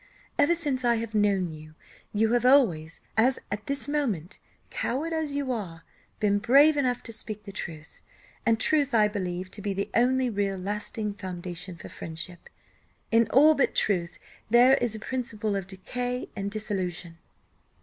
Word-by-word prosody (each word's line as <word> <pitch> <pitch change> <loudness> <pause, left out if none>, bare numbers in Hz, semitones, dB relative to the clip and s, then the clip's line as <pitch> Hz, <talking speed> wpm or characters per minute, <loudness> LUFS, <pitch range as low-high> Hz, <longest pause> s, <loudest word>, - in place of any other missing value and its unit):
Ever 295 +4 +5
since 285 -6 -2
I 240 -1 +3
have 225 -1 -4
known 200 -4 +2
you, 155 0 -12 0.4
you 220 +2 +2
have 245 - +2
always, 195 - +3
as 250 +4 +4
at 205 +1 -4
this 280 +1 0
moment, 235 - -2 0.3
coward 310 +7 -2
as 310 -3 -2
you 280 -2 -1
are, 175 -9 -5 0.4
been 205 -1 +2
brave 280 +8 +6
enough 255 -4 0
to 230 - -8
speak 215 -1 -7
the 200 - -8
truth; 165 -5 -7 0.4
and 225 -1 +2
truth 285 0 +2
I 215 -2 +5
believe 185 -3 -4
to 205 - -8
be 200 0 -2
the 200 - -3
only 255 +2 +3
real 200 -3 -1
lasting 205 +2 -3
foundation 180 -2 -6
for 165 - -10
friendship; 165 +2 -7 0.6
in 230 0 +4
all 300 +4 +7
but 280 - +1
truth 175 -5 +1 0.3
there 245 +3 +7
is 240 -4 -1
a - - -6
principle 220 -3 -3
of 195 -2 -3
decay 245 +6 -4
and 200 -1 -3
dissolution. 185 -5 -3
215 Hz, 165 wpm, -27 LUFS, 185-250 Hz, 0.6 s, all